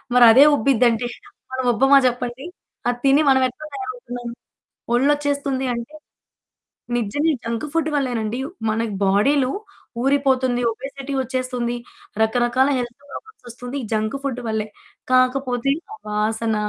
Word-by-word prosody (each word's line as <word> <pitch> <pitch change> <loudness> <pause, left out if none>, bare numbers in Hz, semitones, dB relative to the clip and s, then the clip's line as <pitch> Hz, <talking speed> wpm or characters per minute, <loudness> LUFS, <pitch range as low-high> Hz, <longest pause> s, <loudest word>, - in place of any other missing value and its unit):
మరదే 245 +2 +8
ఉబ్బిద్దంటే 240 -2 +2 0.5
మనముబ్బమా 260 +1 +4
చెప్పండి 245 +2 -3 0.4
అది 245 0 0
తిని 275 +2 +5
మనమెట్లా 260 +2 +1
తయారవుతున్నాం? 245 -2 -6 0.7
ఒళ్ళొచ్చేస్తుంది 280 0 +1
అంటే 235 +5 -7 1.0
నిజంగా 240 +8 0
ఈ - - -1
జంక్ 230 +5 -3
ఫుడ్ 320 -1 0
వల్లేనండి. 240 -4 -1 0.3
మన 215 +1 0 0.3
బాడీలో 255 +8 +3 0.5
ఊరిపోతుంది 265 -2 +2
ఒబెసిటీ 270 +3 -7
వచ్చేస్తుంది. 255 -2 -2 0.5
రకరకాల 240 +4 +2
హెల్త్ 240 -1 -4
ప్రాబ్లమ్స్ 435 - -11
వస్తుంది. 245 +3 -7
ఈ - - -5
జంక్ 215 +3 0
ఫుడ్ 265 -3 -3
వల్లే. 220 -1 -1 0.5
కాకపోతే 255 0 +2 0.2
ఆ - - -10
వాసన, 220 +1 0
250 Hz, 110 wpm, -21 LUFS, 235-275 Hz, 1.0 s, మరదే